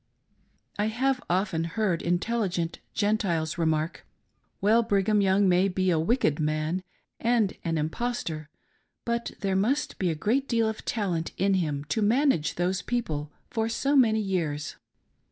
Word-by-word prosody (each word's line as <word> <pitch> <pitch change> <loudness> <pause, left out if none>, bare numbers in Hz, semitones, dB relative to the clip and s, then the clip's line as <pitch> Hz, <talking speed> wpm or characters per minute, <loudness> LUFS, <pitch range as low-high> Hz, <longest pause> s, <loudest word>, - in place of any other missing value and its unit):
I 210 - +2
have 255 +3 0
often 180 -2 +1
heard 170 +1 -1
intelligent 175 -1 -1 0.2
Gentiles 190 -7 0
remark 160 0 0 0.3
" - - -45
Well, 220 +4 +4
Brig 200 -4 +1
ham 210 -1 +3
Young 195 0 +3
may 180 +1 +4
be 185 -1 +1
a 165 - +2
wicked 165 - +1
man 155 +3 0 0.4
and 230 -4 +2
an 165 -1 -1
impostor, 160 -2 -3 0.6
but 235 0 -2
there 195 -1 0
must 230 +10 0
be 185 - +1
a 160 - -1
great 245 - 0
deal 230 -2 +2
of 220 0 -4
talent 180 -7 -1
in 195 +1 +2
him, 150 -6 0
to 220 - 0
manage 230 - +2
those 180 +2 0
people 155 -12 -3 0.2
for 225 -1 0
so 275 +5 0
many 220 -5 +4
years." 160 -7 -2
195 Hz, 155 wpm, -27 LUFS, 165-225 Hz, 0.6 s, Well